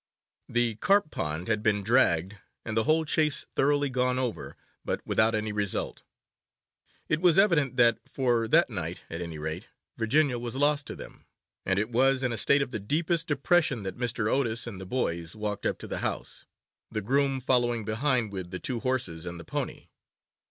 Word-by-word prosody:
The 120 -2 0
carp 195 - +2
pond 80 +3 -3
had 110 -2 0
been 105 -2 +1
dragged, 100 -5 +2 0.3
and 110 - -4
the 110 - +3
whole 160 +1 +3
Chase 155 -1 +2
thoroughly 145 +1 +2
gone 125 -1 0
over, 125 -3 -3 0.3
but - - -2
without 110 +1 +2
any 110 0 -2
result. 105 -2 -2 1.1
It 155 +1 0
was 175 -3 +4
evident 160 -10 +3
that, 120 -1 +5
for 120 -4 +1
that - - +4
night - - -4
at 85 +1 -5
any 85 -2 -6
rate, 80 +6 -5 0.3
Virginia 125 +2 +2
was 120 +1 -5
lost 145 +1 +3
to - - -6
them; - - -12 0.4
and 95 0 +1
it 110 +4 -1
was 130 +2 +3
in 125 - 0
a - - -3
state 140 +6 +4
of 130 - -8
the 110 - -3
deepest 160 - -1
depression 145 - +1
that 95 - -5
Mr. 115 -3 -1
Otis 120 -2 +1
and 100 -6 -7
the 95 - -8
boys 85 -7 -2
walked 105 -1 -3
up - - -1
to - - -9
the - - -3
house, - - -3 0.4
the 110 - -3
groom 135 +4 +1
following 120 -3 +1
behind 115 0 0
with 95 -2 -5
the 90 - -5
two 130 -5 -3
horses 95 -10 -2
and 85 0 -6
the 85 - -10
pony. - - -4
120 Hz, 185 wpm, -28 LUFS, 105-140 Hz, 1.1 s, that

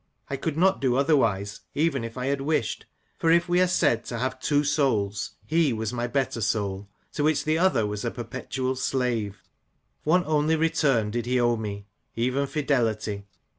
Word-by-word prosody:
I - - 0
could 155 +2 -3
not 190 +3 +3
do 130 -3 +2
otherwise, 115 -9 +1 0.2
even 145 -4 +1
if 115 +2 -7
I 125 - -2
had 140 0 0
wished; 145 -4 -1 0.3
for 165 - +2
if 170 +1 +4
we 175 +1 +3
are 185 - +4
said 150 -10 +2
to 120 - -4
have 130 +2 -2
two 145 +2 +2
souls, 125 -10 0
he 160 -3 +2
was 110 0 -3
my 120 0 -1
better 125 -3 -1
soul, 100 -2 -1 0.2
to 145 - -1
which 155 -1 +2
the 155 +1 +2
other 185 - +3
was 105 -1 -4
a - - 0
perpetual 130 0 -4
slave. 120 -6 -1 0.6
One 175 +4 +3
only 155 +1 +2
return 140 -9 +2
did 120 +1 -3
he 125 0 +2
owe 120 -1 +3
me, 100 -2 -5 0.3
even 130 +4 0
fidelity. 110 -9 -1
130 Hz, 180 wpm, -26 LUFS, 110-150 Hz, 0.6 s, if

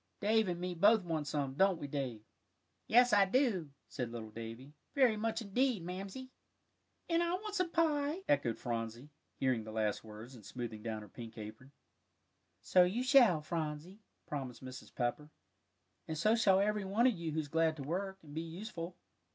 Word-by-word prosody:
"Dave 220 +1 +3
and 175 -1 -2
me 180 0 -2
both 205 +4 +5
want 160 -4 -2
some; 140 -3 -1
don't 190 +5 +3
we, - - -5
Dave?" 135 -6 -4 0.6
"Yes, 245 +2 +6
I 200 -1 +7
do," 195 - +1 0.2
said 125 -4 -4
little 110 -2 -7
Davie, 115 +5 -8 0.2
"very 255 -6 +5
much 225 +1 -1
indeed, 230 -1 +1
Mamsie." 195 +9 -6 0.8
"And 335 0 +2
I 345 +1 +1
want 420 +2 -5
some 365 -4 +1
pie," 315 +1 +1
echoed 130 - +2
Phronsie, 115 +3 -4 0.3
hearing 130 -4 +1
the 110 - -8
last 110 -1 -1
words, 110 +3 -10
and 115 -4 -13
smoothing 115 -1 -6
down 110 -1 -4
her - - -11
pink 115 +3 -10
apron. 110 +5 -9 0.9
"So 180 +10 +6
you 200 +8 0
shall 250 - +6
have, - - -19
Phronsie," 160 +4 -4 0.3
promised 130 -4 -5
Mrs. 130 0 -9
Pepper, 130 +5 -1 0.8
"and 160 - -3
so 215 +8 +4
shall 200 -5 +5
every 210 +1 +1
one 200 +5 +2
of 255 - +5
you 170 -4 -4
who's 155 -1 -1
glad 160 +1 +2
to 145 - -6
work, 190 +6 -3
and 145 -2 -12
be 160 - -2
useful." 170 +1 -6
165 Hz, 180 wpm, -34 LUFS, 130-215 Hz, 0.9 s, I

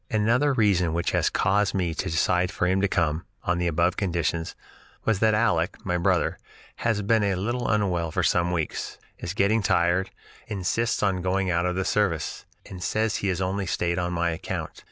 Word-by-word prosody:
"Another 115 +7 +2
reason 100 -9 +2
which 85 0 0
has - - +2
caused 100 +2 +1
me 90 -4 0
to - - -3
decide 90 +2 +1
for 90 - -1
him 95 +1 +2
to 100 - +3
come, 80 -3 0 0.2
on 90 0 0
the 90 - 0
above 85 +3 +1
conditions, 85 -3 -1 0.5
was 110 -3 +2
that 110 0 +3
Aleck 90 -5 +1
[my 90 -2 0
brother] 85 - +1 0.4
has 110 -3 0
been 110 +2 +3
a 100 -2 +1
little 120 +7 -2
unwell 95 -6 +1
for - - -1
some 85 0 +2
weeks, 80 -4 -3 0.2
is 85 +3 -5
getting 105 +3 +3
tired, 90 0 +2 0.4
insists 105 +4 -1
on 95 -3 +1
going 95 0 0
out 85 +1 +1
of 90 - -1
the 95 0 -1
service, 90 -8 -1 0.2
and 95 -2 -9
says 110 +3 0
he 100 - -2
has 95 -1 -1
only 95 +1 -1
stayed 85 +1 0
on 90 0 -1
my 85 0 0
account. 80 - -4
95 Hz, 195 wpm, -25 LUFS, 85-105 Hz, 0.5 s, to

